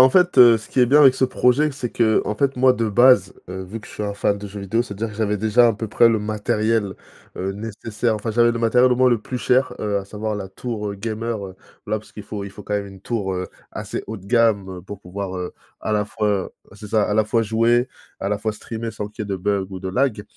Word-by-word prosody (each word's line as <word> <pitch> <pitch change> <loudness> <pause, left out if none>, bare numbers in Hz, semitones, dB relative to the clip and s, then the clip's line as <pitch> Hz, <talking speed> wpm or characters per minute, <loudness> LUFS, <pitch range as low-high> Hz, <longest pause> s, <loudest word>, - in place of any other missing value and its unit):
en 130 - +9
fait, 180 +1 +3
heu, 120 -2 +9
ce 110 - -10
qui - - -4
est 125 - +6
bien 145 +5 +5
avec 135 -3 +7
ce 130 - +3
projet, 130 +4 +2
c'est 130 -3 -5
qu'en 110 -2 +1
fait, 140 +1 +1
moi 130 0 +5
de 115 -3 -1
base, 105 -3 +5
heu, 95 0 -6
vu 110 +5 -7
que - - -14
je - - -13
suis - - -5
un 100 0 -3
fan 100 0 0
de 105 - -7
jeux 100 +1 -8
vidéo. 110 +5 0
C'est-à-dire 110 0 -5
que 105 - -11
j'avais 105 -2 0
déjà 110 +4 +4
à 115 - +3
peu 110 +1 -5
près 115 +3 +5
le 110 -2 +1
matériel, 105 0 0 0.4
heu, 95 +1 -2
nécessaire, 110 +2 -3
enfin, 110 +2 -3
j'avais 120 +1 +3
le 115 - -3
matériel 125 +2 +4
au - - +3
moins 130 0 +4
le 120 - +3
plus 125 - -5
cher, 125 +2 +1
heu, 100 -1 0
à 100 - -6
savoir 105 +1 -4
la 95 -2 -6
tour, 105 +1 -5
heu, - - -6
gamer, 110 +1 -4
heu, 95 -1 -9 0.3
voilà, 110 +1 -1
parce 110 - -17
qu'il 105 - -8
faut 100 0 -6
il 100 - -7
faut 105 +1 -11
quand 105 - -3
même 100 -1 -2
une 95 -1 -12
tour, 100 -3 -2
heu, 90 0 -4 0.2
assez - - -5
haut 110 - -5
de 95 - -13
gamme, 110 -4 +2
heu, - - -9
pour 100 +1 -9
pouvoir, 95 0 -5
heu, 90 -1 -5 0.3
à - - -3
la 105 -1 +1
fois, 105 0 -2
heu 100 -2 0 0.3
c'est 105 0 -10
ça 105 0 +2
à 105 - 0
la 110 0 +3
fois 115 +2 +1
jouer, 115 +3 +2 0.3
à 100 - -2
la 105 - 0
fois 110 +1 -2
streamer, 115 +1 -6
sans 105 -1 -5
qu'il 105 0 -6
y - - -8
ait - - -11
de 95 - -1
bugs 100 +1 -1
ou 95 -1 -7
de 95 - -4
lag. 115 +1 0
110 Hz, 285 wpm, -21 LUFS, 100-120 Hz, 0.4 s, en